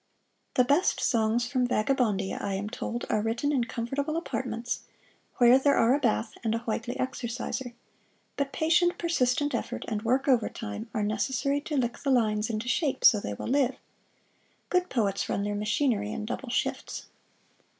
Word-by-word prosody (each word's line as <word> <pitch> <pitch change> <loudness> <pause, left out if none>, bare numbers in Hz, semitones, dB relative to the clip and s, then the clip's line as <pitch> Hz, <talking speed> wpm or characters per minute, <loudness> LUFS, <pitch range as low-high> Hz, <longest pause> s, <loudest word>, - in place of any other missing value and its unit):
The 250 - +5
best 285 +9 +2
"Songs 230 0 +2
From 250 -1 0
Vagabondia," 215 -5 0
I 200 -1 -2
am 205 +2 -4
told, 240 -1 -4
are 215 - +2
written 230 +6 0
in 250 -4 +1
comfortable 275 +7 -2
apartments, 245 -7 -3 0.6
where 245 +1 +7
there 280 +1 +3
are 230 +2 +4
a 285 - +2
bath 225 -3 0
and 225 -1 +1
a - - -1
Whitely 230 +2 -2
Exerciser; 245 0 -3 0.6
but 280 -1 -1
patient, 350 +3 +2
persistent 290 -4 +1
effort - - -3
and 215 -2 -2
work 255 +5 +1
overtime 225 -3 0
are 215 -4 -1
necessary 265 +6 0
to 295 0 -3
lick 240 -2 -1
the 280 - -2
lines 215 -4 +2
into 220 +1 -3
shape 280 +2 0
so 215 - +8
they 105 - -4
will - - -6
live. 265 -1 +2 0.9
Good 360 0 +1
poets 200 -6 0
run 200 - 0
their 205 0 -1
machinery 210 0 0
in 215 - -4
double 245 +3 -5
shifts. 245 - -2
240 Hz, 165 wpm, -28 LUFS, 220-275 Hz, 0.9 s, so